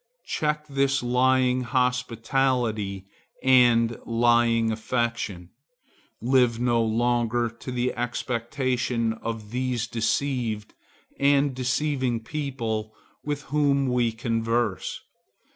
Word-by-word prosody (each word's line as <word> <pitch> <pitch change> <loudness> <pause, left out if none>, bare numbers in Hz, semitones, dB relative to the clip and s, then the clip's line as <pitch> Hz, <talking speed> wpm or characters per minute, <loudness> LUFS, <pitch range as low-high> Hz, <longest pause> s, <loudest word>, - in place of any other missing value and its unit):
Check 150 0 -1
this 135 -2 0
lying 125 +1 +2
hospitality 125 -4 0 0.4
and 120 -3 +4
lying 115 -1 +3
affection. 110 -5 -2 0.7
Live 125 -2 +2
no 120 -1 +2
longer 120 +1 +1
to 115 +2 -8
the 125 0 -1
expectation 120 -1 -1
of 110 -1 -6
these 125 -1 -1
deceived 115 -2 -1 0.5
and 140 0 +3
deceiving 130 -1 0
people 115 -4 -4 0.3
with 145 -1 -3
whom 140 -2 +2
we 120 -2 +2
converse. 115 -2 -1
120 Hz, 90 wpm, -25 LUFS, 115-130 Hz, 0.7 s, and